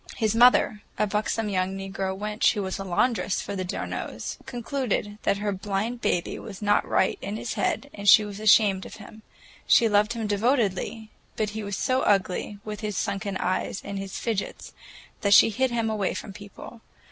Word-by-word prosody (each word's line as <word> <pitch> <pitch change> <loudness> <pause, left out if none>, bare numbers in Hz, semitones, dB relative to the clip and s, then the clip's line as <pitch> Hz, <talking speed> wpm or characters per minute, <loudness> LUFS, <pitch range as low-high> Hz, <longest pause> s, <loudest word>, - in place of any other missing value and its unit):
His 220 -2 +1
mother, 230 -3 +5 0.2
a 215 - +2
buxom 210 +1 -1
young 190 -1 -1
negro 195 0 -4
wench 210 +1 +1
who 205 -3 -2
was 190 +1 -4
laundress 195 +2 0
for 200 - -5
the 185 - -2
d'Arnaults, 180 - -5
concluded 240 -4 -3
that 200 - +1
her 205 0 -1
blind 205 +5 -3
baby 175 - -1
was 205 -4 -9
"not 205 -1 +2
right" 190 - +1
in 200 +2 -4
his 225 - -4
head, 285 - -1
and 200 0 +1
she 210 +2 +8
was 205 0 -7
ashamed 205 -3 +4
of - - -11
him. 215 +1 -13 0.5
She 230 - +6
loved 210 +1 +2
him 230 -2 -4
devotedly, 215 0 0 0.2
but 215 -1 -1
he 220 +1 -5
was 200 -2 -4
so 255 0 +1
ugly, 200 0 0
with 210 -1 -5
his 210 -3 -4
sunken 200 -1 -2
eyes 185 +1 -1
and 200 -1 -4
his 195 -1 -6
"fidgets," 220 -4 -4 0.5
that 200 -1 +5
she 225 - +7
hid 260 +4 +1
him 230 -2 -1
away 215 -3 -1
from 200 - -6
people. 205 +3 -11
210 Hz, 185 wpm, -26 LUFS, 195-220 Hz, 0.5 s, she